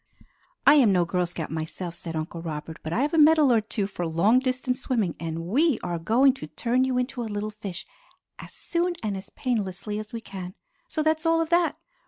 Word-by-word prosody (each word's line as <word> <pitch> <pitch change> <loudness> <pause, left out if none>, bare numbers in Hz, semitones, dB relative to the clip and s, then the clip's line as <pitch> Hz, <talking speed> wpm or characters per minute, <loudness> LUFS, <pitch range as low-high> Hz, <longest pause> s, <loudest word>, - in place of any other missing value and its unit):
"I 285 - +9
am 265 -8 +6
no 180 -2 +3
Girl 180 +1 0
Scout 165 -3 -5
myself," 160 +2 -4
said 165 -1 -7
Uncle 160 +1 -4
Robert, 160 -1 -6
"but 155 - -5
I 225 - +1
have 295 - -1
a 325 - +4
medal 305 -3 +6
or 225 - +4
two 210 -1 -2
for 185 -3 -4
long 190 +10 +4
distance 255 0 -1
swimming, 220 - 0
and 165 0 -4
we 275 - +2
are 175 -1 -2
going 245 +10 +4
to - - -5
turn 245 +2 0
you 260 -1 0
into 250 0 -2
a 225 - -4
little 210 +1 -3
fish 200 -4 -7 0.5
as - - -9
soon 345 +1 -1
and 205 -2 -1
as 190 +1 -8
painlessly 210 -4 -2
as 215 0 -7
we 230 - -4
can. 190 -4 -8 0.3
So 315 -10 -1
that's 315 +1 +1
all 330 0 +4
of 325 -1 0
that! 345 -1 +2
215 Hz, 220 wpm, -26 LUFS, 175-260 Hz, 0.5 s, I